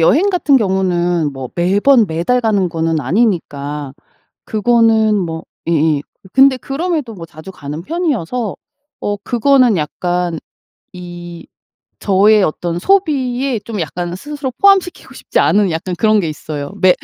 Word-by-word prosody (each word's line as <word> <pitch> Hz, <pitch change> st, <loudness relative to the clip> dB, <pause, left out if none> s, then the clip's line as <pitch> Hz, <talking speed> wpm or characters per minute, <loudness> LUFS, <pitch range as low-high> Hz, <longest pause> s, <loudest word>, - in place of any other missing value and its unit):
여행 315 Hz, -, +4 dB
같은 305 Hz, -8 st, +3 dB
경우는 175 Hz, -6 st, 0 dB
뭐 135 Hz, -2 st, -7 dB
매번 205 Hz, +8 st, +3 dB
매달 170 Hz, +10 st, 0 dB
가는 205 Hz, -5 st, +1 dB
거는 165 Hz, -1 st, -1 dB
아니니까. 145 Hz, -, -1 dB, 0.5 s
그거는 220 Hz, -1 st, +3 dB
뭐 165 Hz, -4 st, -3 dB, 0.2 s
예예. 155 Hz, -3 st, +2 dB, 0.3 s
근데 270 Hz, 0 st, +6 dB
그럼에도 290 Hz, -2 st, -3 dB
뭐 170 Hz, -5 st, -9 dB
자주 160 Hz, +3 st, -11 dB
가는 150 Hz, -2 st, -7 dB
편이어서 250 Hz, -, -2 dB, 0.5 s
어 205 Hz, 0 st, -2 dB
그거는 245 Hz, +2 st, +3 dB
약간 175 Hz, +2 st, -2 dB, 0.5 s
이 175 Hz, -1 st, -9 dB, 0.5 s
저의 205 Hz, +2 st, +4 dB
어떤 170 Hz, 0 st, -2 dB
소비에 270 Hz, -, +1 dB
좀 210 Hz, -2 st, -6 dB
약간 175 Hz, +3 st, -4 dB
스스로 280 Hz, +5 st, -5 dB
포함시키고 390 Hz, -3 st, +2 dB
싶지 -, -, -3 dB
않은 205 Hz, -2 st, +3 dB
약간 170 Hz, +3 st, -3 dB
그런 215 Hz, +3 st, +3 dB
게 170 Hz, -, -2 dB
있어요. 150 Hz, 0 st, -6 dB
매 185 Hz, -1 st, +5 dB
190 Hz, 280 characters per minute, -16 LUFS, 165-250 Hz, 0.5 s, 근데